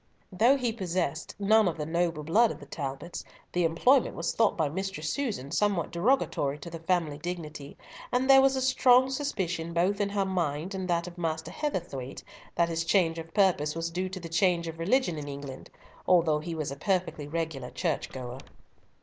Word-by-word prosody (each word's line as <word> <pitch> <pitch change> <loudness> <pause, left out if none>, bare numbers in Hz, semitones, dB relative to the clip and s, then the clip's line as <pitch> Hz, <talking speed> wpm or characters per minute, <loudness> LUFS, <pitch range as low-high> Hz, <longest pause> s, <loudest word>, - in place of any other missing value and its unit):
Though 235 +9 +4
he 245 -4 -1
possessed 175 -7 -2
none 215 +1 +4
of 170 - -1
the 150 - -3
noble 170 -1 -1
blood 220 +10 +4
of - - -6
the 145 - -11
Talbots, 140 +3 -5 0.3
the 180 - +1
employment 230 +12 +3
was - - -2
thought 225 -2 +2
by 160 - +2
Mistress 165 -1 -3
Susan 210 - -3
somewhat 195 -2 +1
derogatory 170 - +1
to 170 +3 -9
the 165 - -6
family 165 -4 0
dignity, 155 -4 -6 0.3
and 250 +1 +1
there 270 0 +8
was 270 0 +4
a 260 - 0
strong 260 0 +5
suspicion 180 - -2
both 190 +5 +1
in 200 - +1
her 200 -1 0
mind 175 -1 -2
and 190 -1 -3
that 170 -1 +1
of 180 0 -9
Master 160 -1 -2
Heatherthwayte 170 - -4 0.3
that 170 - +3
his 165 0 -1
change 165 -1 +2
of 165 0 -9
purpose 175 -7 +3
was 165 0 -3
due 185 +2 -2
to 190 0 -6
the 170 - -7
change 170 0 +2
of 165 0 -7
religion 180 - +1
in 145 - -6
England, 140 -2 -8 0.4
although 165 -4 +4
he 165 +2 -5
was 155 -3 -3
a - - -4
perfectly 180 -3 -1
regular 155 -5 -3
church 165 -5 -2
goer. 125 -1 -7
170 Hz, 190 wpm, -28 LUFS, 155-195 Hz, 0.4 s, there